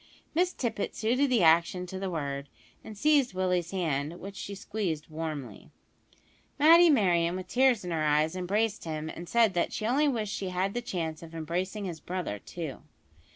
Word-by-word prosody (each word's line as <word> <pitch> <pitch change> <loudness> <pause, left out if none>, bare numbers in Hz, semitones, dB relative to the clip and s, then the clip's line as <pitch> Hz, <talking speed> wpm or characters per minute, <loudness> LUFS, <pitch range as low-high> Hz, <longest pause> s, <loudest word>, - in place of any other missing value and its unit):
Miss 355 +3 +2
Tippet 235 - -3
suited 255 +6 +1
the 240 -7 +3
action 170 +3 +4
to 185 +1 -6
the 195 0 -3
word, 140 -4 -4 0.3
and 215 - -10
seized 285 -4 +3
Willie's 180 -2 0
hand, 160 -3 -2
which 200 +1 -8
she 200 0 -6
squeezed 190 -7 -3
warmly. 155 -8 -6 0.9
Matty 335 +3 +7
Merryon, 175 - +3
with 185 0 -6
tears 250 -3 +3
in 175 - -4
her 160 -2 0
eyes, 150 +2 +2
embraced 205 +4 -1
him, 155 -1 -4
and 170 +2 -8
said 230 -4 +4
that 175 - 0
she 215 - -3
only 275 +6 +3
wished 220 -6 -1
she 190 - -3
had 185 +2 -1
the 240 - -2
chance 165 -8 -4
of 165 0 -11
embracing 180 +6 -3
his 170 -4 -5
brother, 175 - -4
too. 160 - -7
185 Hz, 180 wpm, -29 LUFS, 160-220 Hz, 0.9 s, Matty